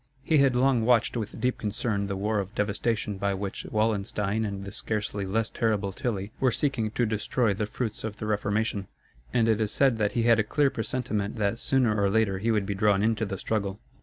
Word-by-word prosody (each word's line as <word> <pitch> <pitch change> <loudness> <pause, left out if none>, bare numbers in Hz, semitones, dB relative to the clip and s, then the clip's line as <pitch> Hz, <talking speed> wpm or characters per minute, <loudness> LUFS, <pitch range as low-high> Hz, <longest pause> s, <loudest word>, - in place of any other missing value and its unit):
He 155 +1 +3
had 135 -2 +4
long 125 -2 +3
watched 120 0 +3
with 110 -3 -4
deep 125 0 0
concern 105 -1 -1
the 100 - -2
war 105 +2 0
of 100 +2 -5
devastation 105 0 -1
by 100 0 0
which 100 0 -5
Wallenstein 105 0 0
and 100 -1 -4
the 100 - -6
scarcely 105 -1 -3
less 110 +3 0
terrible 105 -3 0
Tilly 105 -3 -3
were 130 -2 +3
seeking 130 -5 0
to 120 +3 0
destroy 110 +1 0
the 105 +1 -2
fruits 110 0 -4
of 110 -2 -4
the 110 - -5
Reformation; 105 -1 -1 0.4
and 115 -2 +2
it 110 -1 +2
is 105 -1 0
said 135 -5 +3
that 105 -1 +1
he 120 - +1
had 115 -1 +5
a - - +4
clear 140 +6 +2
presentiment 110 -3 -2
that 110 +1 0
sooner 120 -6 +2
or 100 - +3
later 100 -2 +1
he 115 +4 -1
would 105 -3 +2
be 100 - -2
drawn 100 0 +2
into 110 -1 +1
the 95 -1 -4
struggle. 100 -1 -2
110 Hz, 215 wpm, -27 LUFS, 100-115 Hz, 0.4 s, had